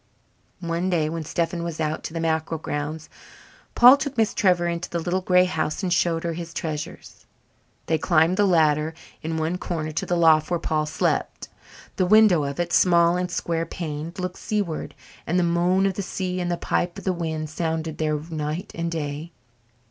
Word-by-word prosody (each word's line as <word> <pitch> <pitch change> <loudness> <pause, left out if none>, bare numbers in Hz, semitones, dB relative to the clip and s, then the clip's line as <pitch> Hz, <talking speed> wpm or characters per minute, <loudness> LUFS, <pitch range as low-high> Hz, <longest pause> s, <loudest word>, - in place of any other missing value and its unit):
One 170 +2 -1
day 160 -4 +1
when 165 0 -4
Stephen 170 +2 -1
was 170 -2 -5
out 155 0 -2
to - - -6
the - - -1
mackerel 160 0 -1
grounds, 150 +1 -4 0.7
Paul 250 +3 +9
took 280 -1 -4
Miss 220 -2 +2
Trevor 180 -3 +2
into 170 0 -3
the 170 - -2
little 175 +3 -1
grey 180 0 +4
house 160 0 -2
and 180 -2 +1
showed 170 -2 +1
her 170 -1 -2
his 170 0 -7
treasures. 150 -2 -6 0.6
They 160 -1 +1
climbed 170 +2 +3
the 205 -1 +4
ladder 155 -2 +2 0.3
in 160 0 -3
one 160 +3 -1
corner 155 -3 -3
to 155 - -2
the 175 - +1
loft 160 -2 +4
where 175 -1 0
Paul 155 -2 -1
slept. - - -1 0.5
The 185 - +2
window 205 -7 +5
of 140 +2 -5
it, 175 0 -1
small 170 -1 +4
and 180 0 -1
square 165 -2 -2
paned, 160 -1 -5
looked 180 0 -4
seaward, 200 -10 -3 0.3
and 175 - +1
the 180 - +3
moan 175 +3 +2
of 195 - +1
the 200 - -3
sea 185 -1 -3
and 175 -1 -1
the 175 - -1
pipe 175 0 -1
of - - -8
the 190 - 0
wind 160 -3 -4
sounded 160 -1 -3
there 155 -1 +1
night 155 +4 -4
and 170 0 -3
day. 155 0 -4
170 Hz, 195 wpm, -24 LUFS, 160-180 Hz, 0.7 s, Paul